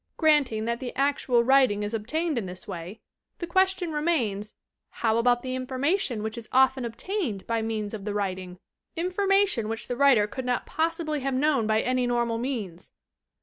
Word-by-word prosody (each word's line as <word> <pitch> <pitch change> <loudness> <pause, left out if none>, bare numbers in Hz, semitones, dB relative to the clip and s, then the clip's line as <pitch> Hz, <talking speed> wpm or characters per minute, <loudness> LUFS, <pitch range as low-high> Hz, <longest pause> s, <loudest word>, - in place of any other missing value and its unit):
Granting 285 -9 +3
that 235 0 -1
the 255 -2 -6
actual 275 -3 +2
writing 255 -5 +4
is 205 +2 -4
obtained 305 +9 -1
in 200 - -5
this 180 +1 -8
way, 180 +5 -7 0.4
the 345 - -4
question 375 0 +1
remains 245 -10 -1 0.3
"How 225 0 0
about 245 +1 +2
the 255 -1 -3
information 260 - -1
which 220 +2 -4
is 225 - -13
often 260 0 +3
obtained 235 - -3
by 230 -1 -1
means 220 -2 -3
of 210 -3 -6
the 205 0 -3
writing, 185 -3 -3 0.4
information 370 - +1
which 225 0 -3
the 245 - -2
writer 260 -5 +5
could 255 +5 -6
not 250 -1 -1
possibly 320 -1 -1
have 270 -1 -2
known 275 -4 +2
by 220 0 +2
any 255 -1 0
normal 235 -1 0
means!" 220 -9 -4
245 Hz, 175 wpm, -26 LUFS, 220-295 Hz, 0.4 s, writer